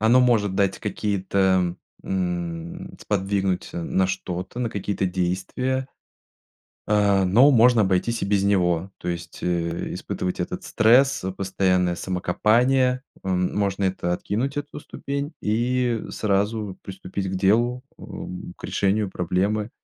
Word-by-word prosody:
оно 115 +4 +5
может 110 -6 +3
дать 100 -1 +1
какие-то 95 -3 +1 0.3
м, 85 -3 -4
сподвигнуть, 95 -2 -1
э, - - -4
на 95 +3 +1
что-то, 90 +3 -4
на 125 -2 0
какие-то 100 -2 -2
действия, 95 +9 -1 1.0
э, 100 -2 +3
но 120 +10 +6
можно 120 -2 +6
обойтись 100 +4 +1
и - - 0
без 100 -1 +2
него, 90 -3 +2
то - - -4
есть, 85 -1 -6
э, 85 -1 -1
испытывать 90 0 -4
этот 90 - -3
стресс, 130 +4 +4
постоянное 90 -2 +1
самокопание. 125 +9 +2 0.2
М, 90 -1 0
можно 100 -1 0
это 95 -2 0
откинуть, 115 +10 -2
эту 145 0 -5
ступень, 140 +1 -5
и 120 +2 0
сразу 105 -1 -1
приступить 95 0 -5
к 95 - -3
делу, 120 +7 +2 0.2
эм, 90 0 -8
к - - -19
решению 100 0 0
проблемы, 100 +5 0
100 Hz, 125 wpm, -24 LUFS, 90-115 Hz, 1.0 s, но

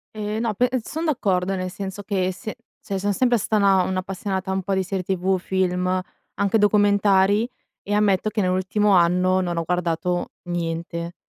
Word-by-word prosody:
E 210 0 -3
no, 225 -1 0
pe 245 +5 +2
son 320 +7 -4
d'accordo, 195 - 0
nel 185 -1 -3
senso 195 +2 -6
che, 190 -2 0
se 200 +4 -7 0.3
cioè 195 - -4
sono 205 +1 0
sempre 245 +3 +2
stata 215 0 0
una 195 -2 +5
un'appassionata 190 +1 -3
un 190 0 -1
po' 195 +1 -1
di 190 - +1
serie 190 0 -3
TV, 190 +1 0
film, 180 -1 0 0.5
anche 200 +2 +2
documentari, 205 +1 +3 0.3
e 205 - -3
ammetto 205 -1 +2
che 215 0 -1
nell'ultimo 190 +3 +1
anno, 180 +1 +4
non 175 -2 -2
ho 165 - 0
guardato 175 +1 -1 0.2
niente, 170 0 -3
190 Hz, 170 wpm, -23 LUFS, 180-205 Hz, 0.5 s, una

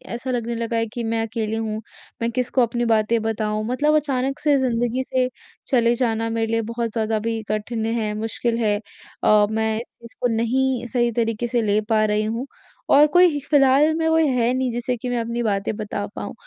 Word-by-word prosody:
ऐसा 255 +2 -4
लगने 235 -1 -2
लगा 230 0 -2
है 225 - +1
कि 240 - -3
मैं 225 0 -1
अकेली 220 -1 -3
हूँ, 220 -1 -3 0.4
मैं 230 - +1
किसको 250 +1 0
अपनी 240 0 0
बातें 225 0 +2
बताऊँ? 215 -1 -1
मतलब 290 +5 +2
अचानक 275 -2 0
से 295 -2 +3
ज़िंदगी 245 -1 0
से 255 -1 +2 0.4
चले 235 -2 +3
जाना 225 -2 0
मेरे 225 0 -1
लिए 230 0 +1
बहुत 230 -1 -2
ज़्यादा 220 -1 0
भी 225 +1 -2
कठिन 220 +2 -2
है, 225 -2 -1
मुश्किल 230 +1 -1
है। 210 -2 +1 0.4
और 210 0 +4
मैं 220 0 0
इस 240 - -15
इसको 240 +1 -3
नहीं 250 +2 0
सही 240 -1 +2
तरीके 230 0 -1
से 235 0 0
ले 210 -1 +2
पा 215 -1 +3
रही 210 0 +1
हूँ। 230 +5 -3 0.5
और 290 +2 +8
कोई 350 -2 +4
फिलहाल 285 +1 +4
में 320 0 0
कोई 320 -1 +3
है 250 -2 +1
नहीं 260 0 0
जिसे 240 +1 -2
कि 245 +2 -5
मैं 245 - 0
अपनी 235 +1 -2
बातें 205 0 -1
बता 205 -1 -4
पाऊँ। 205 - -5
230 Hz, 200 wpm, -22 LUFS, 220-255 Hz, 0.5 s, और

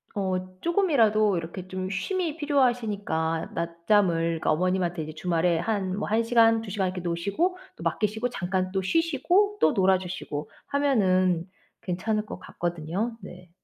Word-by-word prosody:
어 185 -2 -3
쪼금이라도 225 - +3
이렇게 170 +3 -6
좀 185 0 -4
쉼이 325 - -2
필요하시니까 220 - 0
낮잠을 170 +1 +1 0.2
그러니까 - - +1
어머님한테 180 0 0
이제 155 +1 -7
주말에 170 0 +1
한 190 -1 -1
뭐 205 - -2
1 220 +2 +2
시간, 225 -1 +4
2 220 -3 -7
시간 190 -1 0
이렇게 180 0 -4
노시고 200 - -1 0.2
또 - - -10
맡기시고 220 +3 0
잠깐 185 -4 -2
또 190 0 0
쉬시고 335 - +2
또 - - +5
놀아 190 -2 +4
주시고 175 -5 -5 0.2
하면은 185 -12 +2 0.4
괜찮을 210 +4 -1
것 - - -8
같거든요. 175 +7 -3
네. 180 -2 -11
190 Hz, 335 characters per minute, -26 LUFS, 180-230 Hz, 0.4 s, 또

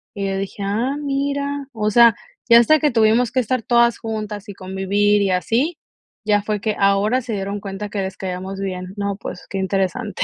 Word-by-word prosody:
Y 200 -1 -2
yo 195 - -2
dije: 195 +1 -5
"Ah, 225 +8 -1
mira, 280 0 -2
o 215 -1 -1
sea, 235 0 +6 0.3
ya 235 - +9
hasta 310 +6 +5
que 300 - +2
tuvimos 225 +1 +3
que 260 - +1
estar 250 +1 -1
todas 235 +1 +3
juntas 215 -2 -5
y - - -6
convivir 200 +2 +1
y 195 - +1
así, 245 - 0 0.5
ya 205 -1 +3
fue 210 0 -2
que 215 0 -1
ahora 200 +5 +3
se 235 -2 -5
dieron 200 0 -3
cuenta 195 +1 -6
que 205 -1 -3
les 190 0 -5
caíamos 190 +1 -5
bien". 185 -1 -5
No, 200 -1 -2
pues, 180 - -8
qué 195 - -3
interesante. 195 +2 -1
210 Hz, 200 wpm, -20 LUFS, 195-235 Hz, 0.5 s, ya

